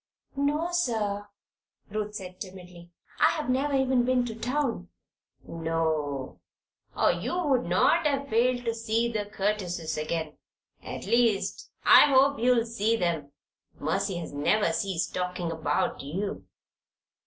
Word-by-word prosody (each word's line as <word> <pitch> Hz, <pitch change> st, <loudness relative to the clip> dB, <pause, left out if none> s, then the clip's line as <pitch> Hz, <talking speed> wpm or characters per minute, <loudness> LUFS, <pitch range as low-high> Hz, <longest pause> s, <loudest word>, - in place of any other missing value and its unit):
"No, 295 Hz, +4 st, 0 dB
sir," 215 Hz, -11 st, -1 dB, 0.6 s
Ruth 210 Hz, 0 st, -3 dB
said, 185 Hz, -2 st, -7 dB
timidly. 180 Hz, -3 st, -10 dB, 0.3 s
"I -, -, +6 dB
have 300 Hz, -5 st, -2 dB
never 275 Hz, +2 st, +1 dB
even 260 Hz, -2 st, +3 dB
been 250 Hz, 0 st, +2 dB
to 230 Hz, -, -4 dB
town." 245 Hz, -, -2 dB, 0.6 s
"No. 160 Hz, -4 st, -2 dB, 0.6 s
Or -, -, +4 dB
you 355 Hz, -, -3 dB
would 270 Hz, -5 st, +2 dB
not 300 Hz, -, +3 dB
have 280 Hz, -1 st, -1 dB
failed 245 Hz, +1 st, +1 dB
to 230 Hz, -, 0 dB
see 230 Hz, +1 st, 0 dB
the 210 Hz, -2 st, -2 dB
Curtises 185 Hz, -6 st, -2 dB
again. 160 Hz, 0 st, -3 dB, 0.4 s
At -, -, -7 dB
least, 230 Hz, -4 st, +1 dB, 0.2 s
I -, -, +9 dB
hope 275 Hz, 0 st, +4 dB
you'll 240 Hz, -1 st, +3 dB
see 230 Hz, -1 st, 0 dB
them. 170 Hz, -8 st, -1 dB, 0.5 s
Mercy 190 Hz, +5 st, -1 dB
has 170 Hz, -3 st, -6 dB
never 165 Hz, +5 st, +2 dB
ceased 180 Hz, 0 st, -2 dB
talking 180 Hz, -2 st, -2 dB
about 155 Hz, -2 st, -1 dB
you." 185 Hz, +9 st, -4 dB
210 Hz, 130 wpm, -27 LUFS, 170-250 Hz, 0.6 s, I